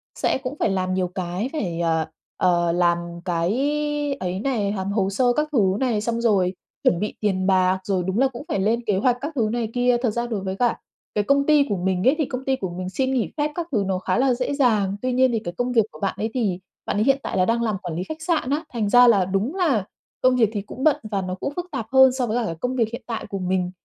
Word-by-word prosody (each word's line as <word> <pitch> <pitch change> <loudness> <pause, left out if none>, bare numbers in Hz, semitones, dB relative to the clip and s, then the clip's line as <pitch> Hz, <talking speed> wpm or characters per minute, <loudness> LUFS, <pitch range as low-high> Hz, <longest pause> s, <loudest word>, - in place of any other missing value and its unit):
sẽ - - +1
cũng 265 +2 -6
phải - - +2
làm 185 -1 -1
nhiều 185 -1 0
cái 180 +6 -3
phải, 175 - -2
ờ, 160 -2 +1 0.3
ờ, 175 -2 +2
làm 175 0 +2 0.3
cái 170 -1 0 0.7
ấy 185 0 -3
này, 215 -4 0
làm 195 0 -3
hồ 195 -2 +1
sơ 245 +5 +2
các 300 +4 0
thứ 270 - +2 0.2
này, 240 -5 +1
xong 235 +1 -1
rồi 195 -5 +2 0.3
chuẩn 175 - +3
bị 210 - -2
tiền 190 -3 0
bạc, 185 0 +3
rồi 190 -2 0
đúng 190 +4 0
là 270 - +5
cũng 260 +1 -8
phải 200 - -1
lên 225 +5 +1
kế 205 -3 +1
hoạch 245 +3 +2
các 295 +3 -3
thứ 220 -4 +1
này 235 -2 -2
kia. 245 0 +3
Thật 250 - +2
ra 235 +2 -2
đối 220 -4 -2
với 190 0 -3
cả 240 +2 +1 0.4
cái 210 - +2
công 280 +4 +2
ty 300 -1 +5
của 200 - 0
mình 185 +1 0
ấy 270 - +5
thì 305 - +1
công 255 +1 -5
ty 265 -1 +2
của 190 -8 -4
mình 180 +1 -5
xin 260 +8 -1
nghỉ 245 -4 0
phép 295 +1 0
các 345 -1 -3
thứ 215 -6 +1
nó 185 -1 0
khá 185 0 -1
là 260 0 +3
dễ 250 +3 -2
dàng. 215 -8 +2
Tuy 255 0 -1
nhiên 255 0 +4
thì 225 - 0
cái 175 -5 -6
công 245 +1 -1
việc 225 -4 +3
của - - -13
bạn 195 - -1
ấy 220 - -2
thì 205 -8 0 0.3
bạn - - -2
ấy 215 - +3
hiện 275 +1 +4
tại - - -3
là 185 - +4
đang 230 +3 +1
làm 215 -4 0
quản 175 -3 -4
lý 180 - -2
khách 315 +9 -7
sạn 320 -5 0
á, 295 +3 0
thành 215 -4 -1
ra 245 +3 +7
là 200 -6 +5
đúng 195 - -1
là 275 - +1 0.4
công 255 0 +4
việc 225 -4 +3
thì 205 - -2
cũng 245 +6 -8
bận 305 -2 +5 0.2
và 200 - 0
nó 185 0 -4
cũng 275 +9 -4
phức 355 - -3
tạp 265 -7 -3
hơn 265 -1 +7
so 255 -1 -1
với 225 +2 0
cả 240 - 0
cái 165 - -3
công 250 +10 -3
việc 230 -4 +1
hiện 235 - -6
tại 230 -2 -4
của 195 - -4
mình. 185 -1 -1
220 Hz, 280 wpm, -23 LUFS, 190-255 Hz, 0.7 s, ra